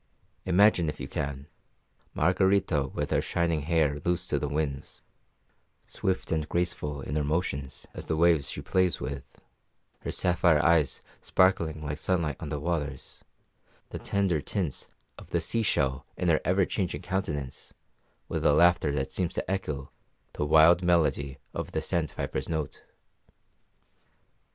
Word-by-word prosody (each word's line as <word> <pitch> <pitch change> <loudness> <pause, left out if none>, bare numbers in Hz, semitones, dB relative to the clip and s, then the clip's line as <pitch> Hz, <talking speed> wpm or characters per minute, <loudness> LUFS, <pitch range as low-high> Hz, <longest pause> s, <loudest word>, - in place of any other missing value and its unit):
Imagine, 95 -3 +4
if - - -6
you - - -5
can, 70 -1 -4 0.7
Margarita 90 -3 +2
with - - -4
her - - +3
shining 85 -2 0
hair 75 -2 +1
loose 90 +1 0
to 75 -4 0
the 75 - -2
winds, 70 -2 -3 0.8
swift 95 -1 -2
and 80 -2 -1
graceful 85 -5 -1
in 75 - -4
her 75 - +1
motions 70 -3 -2
as - - -7
the 80 - 0
waves 80 -5 +4
she - - -5
plays 95 -1 +1
with, 70 -2 -4 0.8
her - - -4
sapphire 85 -3 +3
eyes 85 -4 +3 0.2
sparkling 85 -5 +2
like 75 +1 -4
sunlight 85 -5 0
on 85 - -6
the 75 -1 -3
waters, 75 -4 -4 0.7
the - - -6
tender 95 -6 0
tints 85 -1 -3 0.3
of - - -13
the - - +1
sea 115 - -1
shell 70 -10 0
in 90 - 0
her 80 - +3
ever 95 +1 +3
changing 90 -2 -3
countenance, 75 -8 -3 0.6
with - - -3
a 75 - +5
laughter 85 -1 +4
that 65 -2 -2
seems 90 -3 -2
to - - -2
echo 75 -8 -3 0.4
the - - -2
wild 80 +3 +6
melody 80 -6 +1 0.2
of - - -5
the - - +1
sandpiper's 75 -5 -2
note. 80 -3 -3
80 Hz, 145 wpm, -28 LUFS, 75-90 Hz, 0.8 s, wild